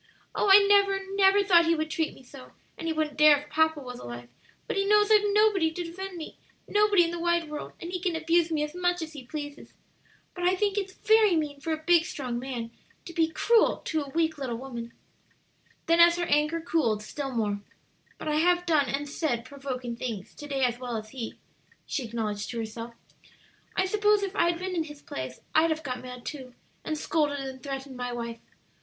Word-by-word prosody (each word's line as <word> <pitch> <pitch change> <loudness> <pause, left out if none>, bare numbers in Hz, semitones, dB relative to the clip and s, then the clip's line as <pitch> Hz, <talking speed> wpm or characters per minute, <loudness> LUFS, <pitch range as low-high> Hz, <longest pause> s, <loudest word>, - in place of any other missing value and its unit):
"Oh, 410 - +1
I 400 +1 +9
never, 400 -1 +4
never 395 0 +5
thought 345 -4 +5
he 335 - +4
would 310 0 -3
treat 320 0 -1
me - - -16
so! 255 +1 -13 0.2
and 330 - -6
he - - +1
wouldn't 310 -2 -2
dare 300 -1 +8
if 295 +1 -10
papa 315 0 +2
was 250 -2 -8
alive; 120 0 -8 0.4
but - - -3
he 395 - +2
knows 420 +1 +4
I've 425 -1 +7
nobody 410 -5 +4
to 350 +2 -4
defend 365 +2 -7
me 320 - -8 0.3
nobody 415 -3 +4
in 335 - -1
the 345 - -4
wide 340 -1 +1
world, 300 - -6
and 340 - -6
he 365 - -2
can 355 -2 -1
abuse 330 +1 +2
me 305 -2 +1
as 300 0 -4
much 355 -1 0
as 315 0 -8
he 285 -4 -9
pleases. 290 -1 -7 0.6
But 355 - -6
I 365 +1 +4
think 405 +1 0
it's 390 -2 -2
very 435 -3 +4
mean 295 -3 -2
for 320 +3 -4
a 315 0 -3
big 340 0 +4
strong 250 -8 -4
man 245 -3 -5 0.3
to 340 - -8
be 325 -1 +2
cruel 460 +7 +3
to 320 - -2
a 285 -2 -5
little - - -15
weak 320 -1 +1
woman." 240 -2 -5 0.9
Then 335 +1 +3
as 340 0 +7
her 350 - 0
anger 300 +2 +1
cooled 235 -11 0
still 275 +5 -5
more, 210 -5 -1 0.6
"But - - -7
I 300 0 +1
have 355 +2 +3
done 300 -6 +2
and 285 +3 -2
said 275 -5 -2
provoking 255 -3 -5
things 230 -6 -5
to 295 - -9
day 275 -2 -1
as 245 -1 +1
well 245 -2 -3
as 215 0 -8
he," 240 -4 -6 0.5
she 275 - -3
acknowledged 215 -2 -3
to 235 - -5
herself. 230 +1 -6 0.8
"I 375 - +2
suppose 420 +1 +2
if 395 0 -3
I'd 340 -2 +2
been 370 +1 -4
in 325 -2 0
his 295 -2 -11
place 130 -1 -6
I'd 320 +1 +4
have 315 0 -2
got 250 -2 -4
mad, 250 -1 -9
too, 260 -5 -7 0.3
and 310 - -2
scolded 295 -2 0
and 265 -1 -7
threatened 270 -1 -6
my 245 0 -4
wife. 235 -1 -5
310 Hz, 215 wpm, -27 LUFS, 255-350 Hz, 0.9 s, I